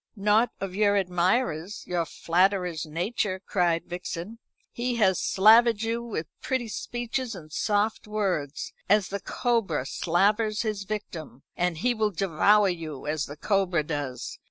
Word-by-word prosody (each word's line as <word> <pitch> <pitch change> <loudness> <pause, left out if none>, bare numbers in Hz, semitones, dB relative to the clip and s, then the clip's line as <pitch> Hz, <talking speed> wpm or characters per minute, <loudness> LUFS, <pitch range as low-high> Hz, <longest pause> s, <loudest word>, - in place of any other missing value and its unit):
"Not 210 +3 +3
of 195 -2 -4
your 205 0 +3
admirer's, 180 0 0
your 175 -2 -1
flatterer's 180 -2 +1
nature," 185 +4 -2
cried 175 -3 0
Vixen. 180 +4 -6 0.3
"He 245 +1 -2
has 190 -6 +3
slavered 225 +2 +5
you 230 +1 -1
with 225 -9 -4 0.2
pretty 255 -3 -2
speeches 240 +1 -3
and 155 -4 -11
soft 210 0 0
words, 185 -9 -2 0.2
as 205 -1 +4
the 200 - -3
cobra 225 - -1
slavers 210 +9 +1
his 210 -3 -3
victim, 170 - -6
and 175 -2 0
he 245 +9 +1
will 220 -2 +1
devour 195 +3 +3
you, 160 -6 -4
as 150 -1 -1
the 145 - -9
cobra 185 -4 +1
does. 145 -4 -5
195 Hz, 140 wpm, -27 LUFS, 170-215 Hz, 0.3 s, slavered